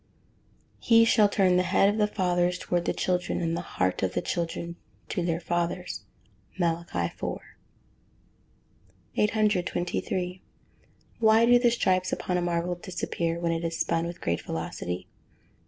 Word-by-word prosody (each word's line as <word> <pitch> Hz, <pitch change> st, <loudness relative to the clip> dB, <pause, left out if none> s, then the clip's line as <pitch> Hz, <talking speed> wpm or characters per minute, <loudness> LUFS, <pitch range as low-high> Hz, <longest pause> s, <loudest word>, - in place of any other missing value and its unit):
[Verse: -, -, -16 dB
"He 230 Hz, 0 st, +7 dB
shall 215 Hz, -2 st, +5 dB
turn 190 Hz, -3 st, +3 dB
the -, -, +4 dB
heart 195 Hz, -, +3 dB
of 205 Hz, +2 st, +1 dB
the 210 Hz, -, +4 dB
fathers 180 Hz, -3 st, +1 dB
towards 175 Hz, -1 st, -1 dB
the -, -, +3 dB
children, 180 Hz, -1 st, -1 dB
and 165 Hz, -1 st, -1 dB
the 170 Hz, -, -2 dB
heart 95 Hz, -, -1 dB
of 95 Hz, -1 st, -1 dB
the -, -, +1 dB
children 170 Hz, 0 st, -3 dB, 0.3 s
to 180 Hz, -, -1 dB
their 165 Hz, -1 st, 0 dB
fathers." 175 Hz, +1 st, -2 dB, 0.5 s
MALACHI 165 Hz, -, -1 dB
IV.] -, -, -4 dB, 1.8 s
823. 185 Hz, -3 st, 0 dB, 0.8 s
_Why 220 Hz, +1 st, +6 dB
do 245 Hz, +1 st, +6 dB
the 240 Hz, -1 st, +4 dB
stripes 185 Hz, -6 st, +1 dB
upon 180 Hz, -, -2 dB
a 180 Hz, -, +1 dB
marble 175 Hz, 0 st, 0 dB
disappear 170 Hz, -1 st, -3 dB
when 170 Hz, -1 st, 0 dB
it 165 Hz, 0 st, -2 dB
is 165 Hz, -1 st, -2 dB
spun 165 Hz, 0 st, 0 dB
with 170 Hz, -, -8 dB
great 85 Hz, 0 st, -1 dB
velocity? 85 Hz, +2 st, -4 dB
175 Hz, 150 wpm, -27 LUFS, 170-190 Hz, 1.8 s, He